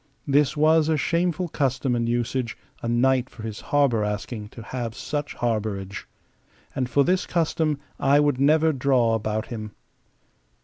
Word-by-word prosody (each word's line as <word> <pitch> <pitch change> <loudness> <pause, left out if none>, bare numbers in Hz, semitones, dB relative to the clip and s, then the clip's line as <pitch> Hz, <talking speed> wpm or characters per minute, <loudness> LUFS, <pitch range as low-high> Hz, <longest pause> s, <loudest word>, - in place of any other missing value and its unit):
This 145 +1 +2
was 155 +1 +4
a 160 - +2
shameful 170 +3 0
custom 135 -4 0
and 115 -1 0
usage, 120 0 -1 0.2
a - - -3
knight 130 +2 +2
for 110 - -12
his 110 -2 -5
harbour 140 -7 +2
asking 105 +1 -4
to 115 - -10
have 115 -1 -5
such 150 -1 -4
harbourage. 105 -4 -3 0.7
And 130 -2 -1
for 140 +2 +3
this 185 +5 +1
custom 160 -3 0 0.2
I 140 +1 +4
would 145 -3 +2
never 155 +3 +4
draw 130 -4 +2
about 110 0 -1
him. 110 -3 -6
130 Hz, 150 wpm, -24 LUFS, 115-150 Hz, 0.7 s, was